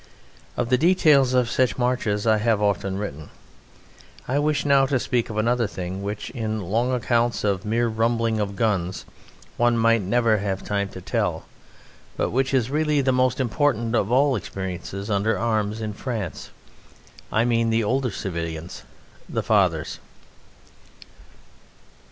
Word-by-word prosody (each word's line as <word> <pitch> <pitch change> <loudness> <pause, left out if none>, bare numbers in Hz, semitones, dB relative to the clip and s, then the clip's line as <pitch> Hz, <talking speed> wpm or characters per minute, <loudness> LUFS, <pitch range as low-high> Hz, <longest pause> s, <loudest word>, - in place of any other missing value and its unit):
Of 120 -1 -1
the 125 0 +3
details 150 -7 +4
of 125 -2 +3
such 120 -4 +1
marches 120 -4 0
I 110 -1 +4
have 110 -1 +2
often 100 -2 0
written. 80 -7 -6 1.0
I 135 +3 +1
wish 150 0 0
now 140 -1 +4
to 135 -1 +1
speak 120 -1 -1
of 110 - -5
another 115 +1 +1
thing, 95 0 -5
which, 105 +1 -5
in 110 -4 -3
long 110 +7 0
accounts 120 -1 0
of 100 -2 0
mere 115 +3 +1
rumbling 115 0 0
of 100 -1 -2
guns, 95 -6 -1 0.5
one 120 0 +3
might 115 0 +3
never 110 +2 +2
have 95 -1 -3
time 100 -1 -1
to 95 - -8
tell, - - -2 0.7
but - - 0
which 130 +2 0
is 130 -2 +1
really 150 -1 +1
the 130 -1 +2
most 130 0 +1
important 120 -2 0
of 110 -2 +1
all 135 +2 +4
experiences 95 0 -5
under 100 +2 +1
arms 110 -1 -1
in 105 -1 -3
France 105 - -5 0.8
I 115 +2 +2
mean 115 -1 +2
the 115 0 +2
older 130 +4 0
civilians, 85 -4 -5 0.5
the - - -2
fathers. - - +1
115 Hz, 150 wpm, -23 LUFS, 100-125 Hz, 1.0 s, details